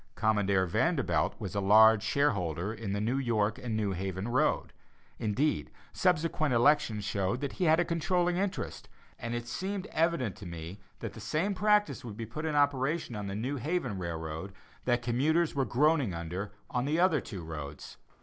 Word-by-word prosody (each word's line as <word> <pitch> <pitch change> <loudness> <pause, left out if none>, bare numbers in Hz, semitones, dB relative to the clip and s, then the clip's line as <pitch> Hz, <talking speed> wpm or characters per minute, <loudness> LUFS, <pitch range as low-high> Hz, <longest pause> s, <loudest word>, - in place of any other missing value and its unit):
Commodore 100 -3 +2
Vanderbilt 85 - +1
was - - -5
a 100 - 0
large 110 +2 +7
shareholder 100 - 0
in 110 -3 -5
the 100 - -1
New 120 +6 0
York 110 -4 0
and 115 -3 -3
New 105 -2 0
Haven 95 +3 -3
road; 125 - +1 0.5
indeed, 120 +7 0 0.2
subsequent 160 -6 +1
elections 115 -4 +3
showed 100 +2 -1
that 140 - -2
he 180 - -1
had 160 +1 +5
a 175 - +3
controlling 175 +1 +1
interest, 195 +1 -3 0.3
and 120 0 -3
it 120 0 -4
seemed 190 - -3
evident 160 - +1
to 105 -5 -9
me 85 +3 -7 0.2
that - - -5
the - - -10
same 185 +7 -1
practice 210 +1 +2
would 110 -4 -8
be 115 - -4
put 155 +9 -5
in 155 - -1
operation 145 -1 +1
on 105 -1 -4
the 100 - -4
New 130 +7 -2
Haven 130 - -2
Railroad, 80 +1 -5 0.3
that 120 -1 +1
commuters 150 +8 +2
were 135 -2 +1
groaning 135 - +2
under 90 +5 -4 0.2
on 125 0 0
the 145 - -1
two - - +1
other 145 - 0
roads. 75 -2 -7
120 Hz, 180 wpm, -30 LUFS, 100-155 Hz, 0.5 s, large